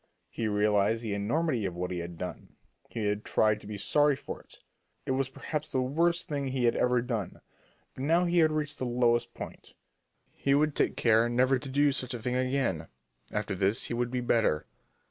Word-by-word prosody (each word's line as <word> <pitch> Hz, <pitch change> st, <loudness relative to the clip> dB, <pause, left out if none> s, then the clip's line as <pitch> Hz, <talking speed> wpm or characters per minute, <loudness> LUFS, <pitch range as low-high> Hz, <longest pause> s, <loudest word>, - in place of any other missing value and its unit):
He 115 Hz, -, -2 dB
realized 105 Hz, +1 st, +2 dB
the 110 Hz, -3 st, -2 dB
enormity 120 Hz, +5 st, 0 dB
of 90 Hz, -3 st, -3 dB
what 90 Hz, +1 st, -3 dB
he 90 Hz, -, -2 dB
had 85 Hz, 0 st, -6 dB
done. 90 Hz, -, -7 dB, 0.3 s
He 110 Hz, -, -3 dB
had 105 Hz, +1 st, -1 dB
tried 105 Hz, -1 st, +2 dB
to 100 Hz, -, -12 dB
be 105 Hz, -1 st, -5 dB
sorry 145 Hz, +8 st, +3 dB
for -, -, -7 dB
it. -, -, -15 dB, 0.5 s
It -, -, -1 dB
was 130 Hz, 0 st, 0 dB
perhaps 150 Hz, +3 st, -4 dB
the 130 Hz, -, +1 dB
worst 170 Hz, +6 st, +1 dB
thing 140 Hz, -2 st, -2 dB
he 130 Hz, -1 st, -1 dB
had 120 Hz, -, +3 dB
ever 125 Hz, -1 st, +2 dB
done, 115 Hz, -7 st, -3 dB, 0.5 s
but 130 Hz, -, -6 dB
now 165 Hz, +5 st, +3 dB
he 175 Hz, 0 st, +2 dB
had 160 Hz, -1 st, +5 dB
reached 150 Hz, -1 st, -2 dB
the 130 Hz, -, -1 dB
lowest 120 Hz, -1 st, +1 dB
point. -, -, -9 dB, 0.6 s
He 140 Hz, 0 st, +1 dB
would 150 Hz, +1 st, +2 dB
take -, -, +1 dB
care 115 Hz, 0 st, +4 dB
never 130 Hz, +2 st, +3 dB
to 135 Hz, -, -6 dB
do 145 Hz, +2 st, +3 dB
such 130 Hz, -2 st, -2 dB
a -, -, -5 dB
thing 125 Hz, +2 st, -2 dB
again. 130 Hz, -, 0 dB, 0.4 s
After 105 Hz, -1 st, -2 dB
this 100 Hz, +5 st, +1 dB
he -, -, -2 dB
would 120 Hz, 0 st, -1 dB
be 125 Hz, 0 st, -2 dB
better. 115 Hz, -10 st, +1 dB
120 Hz, 205 wpm, -29 LUFS, 105-140 Hz, 0.6 s, had